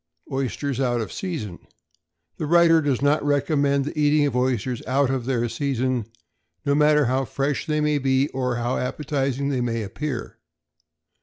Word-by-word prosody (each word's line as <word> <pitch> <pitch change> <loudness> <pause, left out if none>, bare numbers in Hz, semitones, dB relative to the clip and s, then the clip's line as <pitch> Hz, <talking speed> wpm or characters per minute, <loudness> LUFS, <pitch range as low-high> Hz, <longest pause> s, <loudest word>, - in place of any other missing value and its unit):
=Oysters 135 0 -2
out 120 -3 +1
of 110 - -4
Season.= 140 - -5 0.8
The 155 - -3
writer 170 0 +5
does 140 -3 0
not 145 +1 +3
recommend 140 -1 +1
the 150 - -5
eating 150 0 +4
of 140 -4 -1
oysters 125 -1 0
out 135 0 +2
of 130 -3 -2
their 120 -3 0
season, 130 -1 -1 0.6
no 140 - +2
matter 150 0 +4
how 130 +2 +1
fresh 140 +5 -2
they 150 -1 0
may 150 -1 +1
be, 135 +1 +2
or 125 -2 -2
how 120 +1 -1
appetizing 140 0 -2
they 130 -3 0
may 115 -2 -1
appear. 120 +5 -5
135 Hz, 160 wpm, -23 LUFS, 125-145 Hz, 0.8 s, writer